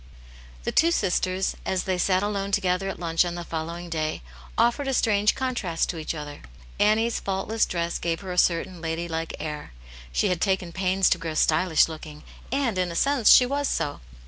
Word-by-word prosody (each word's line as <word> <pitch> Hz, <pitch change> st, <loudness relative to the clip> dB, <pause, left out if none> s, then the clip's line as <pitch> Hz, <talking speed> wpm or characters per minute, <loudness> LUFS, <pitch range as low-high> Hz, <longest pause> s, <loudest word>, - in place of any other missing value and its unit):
THE -, -, -1 dB
two 330 Hz, -, +4 dB
sisters, 190 Hz, -, 0 dB
as 185 Hz, -1 st, -1 dB
they 185 Hz, -1 st, -1 dB
sat 185 Hz, +1 st, +2 dB
alone 200 Hz, -1 st, -2 dB
together 195 Hz, -1 st, +1 dB
at -, -, -5 dB
lunch 165 Hz, -1 st, +2 dB
on 175 Hz, -1 st, -4 dB
the 175 Hz, -, -5 dB
following 170 Hz, +1 st, -5 dB
day, 155 Hz, -, -3 dB, 0.3 s
offered 240 Hz, +4 st, +2 dB
a 270 Hz, -, +1 dB
strange 210 Hz, -3 st, +3 dB
contrast 245 Hz, -11 st, -1 dB
to 165 Hz, -, -7 dB
each 155 Hz, +1 st, -4 dB
other. 150 Hz, -1 st, -7 dB, 0.4 s
Annie's 220 Hz, +3 st, +3 dB
faultless 200 Hz, +3 st, -1 dB
dress 170 Hz, -1 st, -2 dB
gave 165 Hz, +1 st, -2 dB
her 190 Hz, -2 st, -6 dB
a 180 Hz, -, -5 dB
certain 175 Hz, 0 st, +1 dB
lady 165 Hz, +1 st, -3 dB
like 165 Hz, 0 st, -4 dB
air; 150 Hz, -, -6 dB, 0.4 s
she -, -, +1 dB
had 180 Hz, -2 st, -1 dB
taken 190 Hz, -3 st, 0 dB
pains 190 Hz, +1 st, +1 dB
to 175 Hz, -, +2 dB
grow 165 Hz, -1 st, -4 dB
stylish 160 Hz, +1 st, +3 dB
looking, 155 Hz, -2 st, -9 dB, 0.3 s
and, 255 Hz, -8 st, 0 dB
in 180 Hz, -1 st, 0 dB
a -, -, -6 dB
sense, 275 Hz, +1 st, +4 dB
she 250 Hz, -, +8 dB
was 280 Hz, +2 st, -1 dB
so. 145 Hz, -, -2 dB
180 Hz, 195 wpm, -25 LUFS, 165-205 Hz, 0.4 s, she